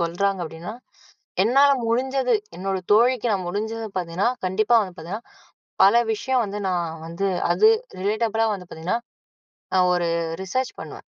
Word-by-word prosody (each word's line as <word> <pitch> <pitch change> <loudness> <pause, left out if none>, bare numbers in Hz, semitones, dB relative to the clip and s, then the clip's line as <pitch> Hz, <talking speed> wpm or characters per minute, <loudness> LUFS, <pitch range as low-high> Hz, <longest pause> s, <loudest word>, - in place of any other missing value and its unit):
சொல்றாங்க 185 +3 0
அப்படின்னா, 165 +5 -7 0.7
என்னால 275 +5 +5 0.2
முடிஞ்சது 255 +1 +1 0.2
என்னோட 190 +1 -2
தோழிக்கு 240 +2 +4
நான் 190 -3 -1
முடிஞ்சத 220 +4 -3
பார்த்தீங்கன்னா, 180 +4 0 0.2
கண்டிப்பா 215 +5 +3
வந்து 185 -3 -7
பார்த்தீங்கன்னா, 185 +8 -7 0.6
பல 235 +5 +6
விஷயம் 255 +3 0
வந்து 205 +1 -5
நான் 170 -3 -2
வந்து 170 +4 -2 0.3
அது 435 - +6 0.3
ரிலேட்டபுள்லா 220 +3 +1
வந்து 180 -2 -11
பார்த்தீங்கன்னா, 175 +8 -2 0.7
நான் 180 -1 +4
ஒரு 175 -1 0 0.3
ரிசர்ச் 255 +7 -2
பண்ணுவேன். - - -9
200 Hz, 135 wpm, -23 LUFS, 180-235 Hz, 0.7 s, பல